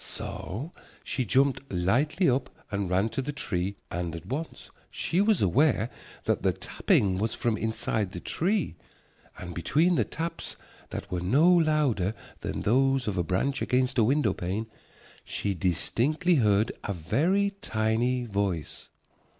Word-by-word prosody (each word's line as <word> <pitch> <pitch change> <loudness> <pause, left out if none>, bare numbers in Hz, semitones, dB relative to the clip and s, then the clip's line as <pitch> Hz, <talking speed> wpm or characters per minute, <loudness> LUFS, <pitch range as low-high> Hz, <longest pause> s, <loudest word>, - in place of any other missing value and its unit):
So 135 - -5 0.3
she 130 - -2
jumped 135 +4 +3
lightly 120 - +2
up 130 0 +1 0.2
and 100 -2 -1
ran 95 +5 +2
to 135 - -2
the 140 +3 -3
tree, 100 -8 -2 0.2
and 85 -2 -3
at 85 +1 -8
once 145 - -5 0.2
she 180 - 0
was 210 - +3
aware 120 - +3 0.3
that - - 0
the - - +2
tapping 95 -2 +1
was 110 +2 -1
from 115 -2 0
inside 110 -3 -1
the 90 - -6
tree. 185 - 0 0.6
And 90 -1 -7
between 155 - +2
the - - +3
taps 165 +1 -5 0.3
that - - -6
were 90 -1 -1
no 135 - +4
louder 150 - +2 0.2
than - - -4
those 135 +3 +3
of 105 - -1
a 90 - +1
branch 95 +11 0
against 130 0 +1
a - - +6
window 125 -3 +2
pane 95 +6 -3 0.6
she 100 - -2
distinctly 115 - +1
heard 105 -2 +3
a 100 - -2
very 155 - +1
tiny 115 +3 0
voice. 100 -7 -3
115 Hz, 150 wpm, -28 LUFS, 95-145 Hz, 0.6 s, a